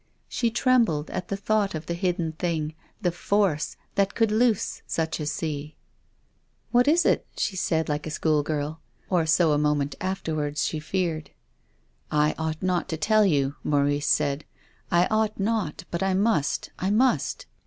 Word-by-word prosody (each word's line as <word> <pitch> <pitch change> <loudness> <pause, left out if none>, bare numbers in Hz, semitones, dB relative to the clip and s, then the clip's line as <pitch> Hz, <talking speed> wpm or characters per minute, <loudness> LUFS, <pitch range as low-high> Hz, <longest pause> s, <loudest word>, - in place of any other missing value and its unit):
She 235 - 0
trembled 230 - +2
at 180 - -4
the 200 - -2
thought 205 -2 0
of 155 - -5
the 170 - -2
hidden 170 -2 -1
thing, 160 -2 -2 0.3
the 175 - +2
force, 175 -3 0 0.2
that 195 -1 +1
could 225 -2 +2
loose 225 -1 +1
such 160 0 -1
a 150 - -3
sea. 150 -1 -3 0.5
" - - -43
What 245 +1 +4
is 330 +4 +4
it? - - +2
" - - -31
she 195 - -1
said 160 -3 0
like 150 +1 -2
a - - -3
schoolgirl 155 0 -1
— - - -36
or 170 -3 +2
so, 165 0 +4
a 145 - +2
moment 150 -1 +1
afterwards, 155 -6 -2
she 155 - -1
feared. 160 -1 -2 0.5
" 65 +4 -40 0.2
I - - -2
ought 160 0 -3
not 180 -2 0
to 160 - -2
tell 215 +5 +4
you," 140 -4 +1
Maurice 145 0 +1
said, 145 0 +1 0.3
" - - -35
I 175 +1 +5
ought 215 -1 +1
not, 205 -6 -1
but 170 - -2
I 190 -1 +1
must 195 -8 +1
— - - -20
I 190 - 0
must." 245 +6 +1
165 Hz, 185 wpm, -26 LUFS, 150-200 Hz, 0.5 s, I